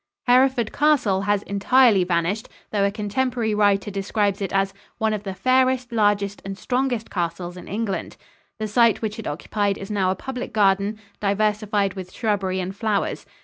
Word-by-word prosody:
Hereford 250 -2 +3
Castle 275 -11 +2
has 205 -1 +2
entirely 205 0 +4
vanished, 180 +4 -1 0.2
though 205 -2 +1
a 200 - +3
contemporary 220 +2 -1
writer 205 -1 +2
describes 200 0 -1
it 195 - -2
as 195 0 +1 0.2
"one 220 -1 +1
of 210 - -2
the 195 -2 -6
fairest, 255 +1 +2
largest, 205 -2 +1
and 195 0 -6
strongest 250 -2 -1
castles 175 0 -3
in 180 - -10
England." 205 -2 -3 0.4
The 215 -1 -3
site 230 +1 +3
which 215 0 -3
it 225 - -6
occupied 200 +6 -1
is 195 +1 -7
now 195 -3 +1
a 190 - +1
public 250 +2 -6
garden, 200 0 +2 0.2
diversified 210 -1 +1
with 185 -2 -8
shrubbery 195 -5 -1
and 185 +1 -4
flowers. 210 -1 -1
205 Hz, 165 wpm, -23 LUFS, 195-225 Hz, 0.4 s, entirely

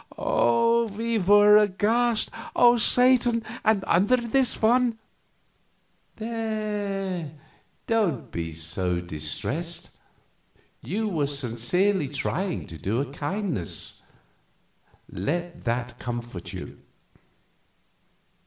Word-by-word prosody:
We 230 - +1
were 205 +2 +6
aghast. 215 +3 +2 0.2
"Oh, 240 0 +6
Satan! 245 0 +4 0.2
and 215 -3 +2
under 200 +9 +3
this 245 +2 0
one 235 +1 +3 0.6
" - - -42
"There, 210 -6 -3 0.5
don't 205 - 0
be 85 -1 -4
so 85 +3 -1
distressed. 90 - -4 0.8
You 220 +4 -2
were 160 -8 0
sincerely 145 - 0
trying 175 +6 -3
to 80 - -11
do 110 +5 -1
him 135 -1 -3
a - - -14
kindness; 155 - -3 1.1
let 170 - -4
that 120 +1 -2
comfort 120 -6 -6
you." - - -8
195 Hz, 90 wpm, -25 LUFS, -, 1.1 s, were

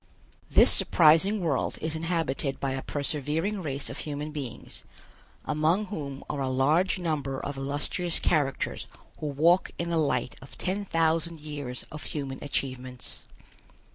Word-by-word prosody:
This - - +8
surprising 175 +6 +5
world 155 -7 0
is 160 0 -2
inhabited 160 -4 -1
by 135 - -1
a 135 0 -2
persevering 150 +9 -2
race 140 -4 -3
of - - -5
human 150 0 -4
beings, 140 -6 -6 0.6
among 155 +7 +1
whom 145 -8 -6
are 140 - -3
a 135 - 0
large 150 +10 +2
number 145 -6 -2
of 145 - -4
illustrious 145 +5 -2
characters 145 -5 0 0.3
who 155 - -3
walk 165 +6 +3
in 170 0 -2
the 165 - +1
light 145 -4 0
of 135 - -13
ten 195 +2 -2
thousand 165 -1 +1
years 145 -4 -6
of 150 - -7
human 135 -3 -5
achievements. 130 -3 -4
150 Hz, 140 wpm, -28 LUFS, 135-165 Hz, 0.6 s, This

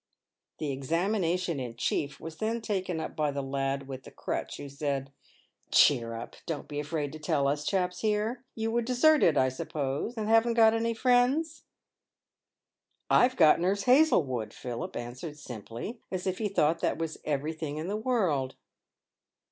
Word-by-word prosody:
The 150 -2 -2
examination 170 +3 0
in 120 -3 -5
chief 140 +4 -1
was 160 -1 -8
then 225 +4 -1
taken 190 -6 -2
up - - -5
by 150 -1 +1
the 140 -1 -3
lad 135 0 -2
with 130 -1 -6
the - - -12
crutch, - - -4
who 145 - -7
said: 140 -1 -3 0.3
" - - -40
Cheer 115 -1 +4
up, 115 - -8
don't 160 -4 -4
be 145 -1 -4
afraid 150 -1 -3
to 155 - -8
tell 150 -3 +1
us 145 +1 0
chaps 180 +1 0
here. 220 +3 0
You 225 0 -1
were 240 +1 +1
deserted, 250 - +4
I 130 -1 +4
suppose, 140 - -3
and 215 -1 -2
haven't 225 +1 +4
got 225 -1 +6
any 230 0 0
friends 255 +7 +2 0.5
?" - - -62
" - - -62 0.3
I've 255 +1 +5
got 155 -1 +6
Nurse 195 +3 +1
Hazlewood," 150 - +3
Philip 120 -2 -5
answered, 125 +6 -6
simply, 120 - -7
as 185 -1 -3
if 185 -1 -1
he 215 - 0
thought 165 -3 +2
that - - 0
was 165 -1 -4
everything 150 +1 -3
in 155 +3 -4
the 200 - -2
world. 190 - 0
160 Hz, 170 wpm, -29 LUFS, 140-220 Hz, 0.5 s, got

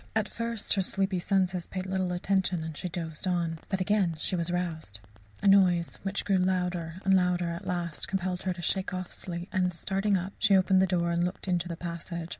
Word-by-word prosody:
At 220 -1 +2
first 230 -2 -1
her 195 - +2
sleepy 190 0 +1
senses 185 -1 +1
paid 185 -1 -4
little 190 -1 -1
attention 180 -1 0
and 160 -1 -5
she 180 - -4
dozed 165 0 -4
on. 170 -3 0
But 190 -1 0
again 190 -3 +2
she 185 - -1
was 170 -1 0
roused. 165 - -2 0.4
A - - +3
noise 185 -3 +4
which 195 0 -2
grew 195 -2 +3
louder 180 -3 0
and 195 - +4
louder 180 -2 +2
at 170 - -6
last 175 -3 -2
compelled 185 -2 -2
her 185 - -1
to 175 -1 -9
shake 190 +1 0
off 185 -1 -5
sleep, 175 0 -6
and 185 -1 +2
starting 195 +3 +1
up, 185 +2 -4
she 200 -3 +5
opened 190 0 +4
the 190 - +4
door 170 -1 +1
and 170 0 +1
looked 180 +2 -3
into 175 -1 +1
the 170 -1 -5
passage. 170 0 -5
180 Hz, 215 wpm, -29 LUFS, 170-190 Hz, 0.4 s, she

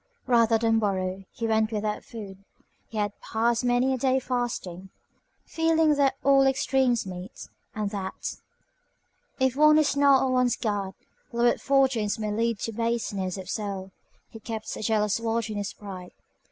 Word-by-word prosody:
Rather 230 -2 +4
than 225 0 +2
borrow, 190 -2 -1
he 230 - -5
went 220 0 +1
without 210 -1 -2
food. 195 -4 -10 0.4
He 220 - -8
had 205 -1 0
passed 230 +2 0
many 245 +2 +2
a 260 - -2
day 260 +1 +2
fasting. 235 -8 -4 0.6
Feeling 325 -1 +2
that 275 -2 +2
all 275 -1 +5
extremes 265 -3 +1
meet, 185 +3 -8 0.3
and 210 -2 -2
that, 195 -2 -5 1.0
if 260 -1 +2
one 305 +1 +6
is 300 -2 +2
not 280 -2 +5
on 260 - 0
one's 250 -1 +2
guard, 200 -4 -3 0.4
lowered 240 0 +2
fortunes 260 -6 +2
may 215 -1 -3
lead 230 +1 0
to 225 - -2
baseness 215 -5 -2
of 190 -1 -8
soul, 195 -2 -4 0.4
he 225 - -12
kept 220 0 -5
a - - -7
jealous 210 -1 +1
watch 230 0 -1
on 210 - -4
his 200 -1 -3
pride. 185 -3 -9
225 Hz, 160 wpm, -26 LUFS, 205-255 Hz, 1.0 s, one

